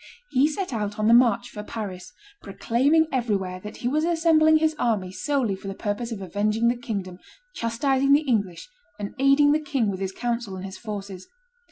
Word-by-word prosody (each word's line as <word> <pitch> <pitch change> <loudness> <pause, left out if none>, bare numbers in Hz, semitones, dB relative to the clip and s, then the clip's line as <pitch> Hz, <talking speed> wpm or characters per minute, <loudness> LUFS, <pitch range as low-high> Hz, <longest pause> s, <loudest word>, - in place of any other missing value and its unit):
He 265 +3 +4
set 315 0 -4
out 210 -2 -3
on 215 0 +1
the 230 - +6
march 240 0 +4
for 210 - -7
Paris, 205 -4 -7 0.3
proclaiming 250 +10 +2
everywhere 200 -8 -1
that 210 +3 -9
he - - +3
was 300 +5 +1
assembling 325 -2 +4
his 315 0 +1
army 210 -6 0
solely 235 +1 -1
for 195 - -10
the 195 - -5
purpose 215 +4 -3
of 205 -4 -5
avenging 210 +5 +1
the 240 - +1
kingdom, 200 -7 -5 0.3
chastising 265 +4 0
the 290 - +5
English, 200 - -1 0.3
and 205 -1 -6
aiding 275 +2 +5
the 305 - +3
king 270 -8 0
with 190 - -5
his 190 -1 -3
counsels 235 -2 -3
and 185 +1 -7
his 190 0 -8
forces. 200 -4 -7
230 Hz, 190 wpm, -24 LUFS, 200-275 Hz, 0.3 s, the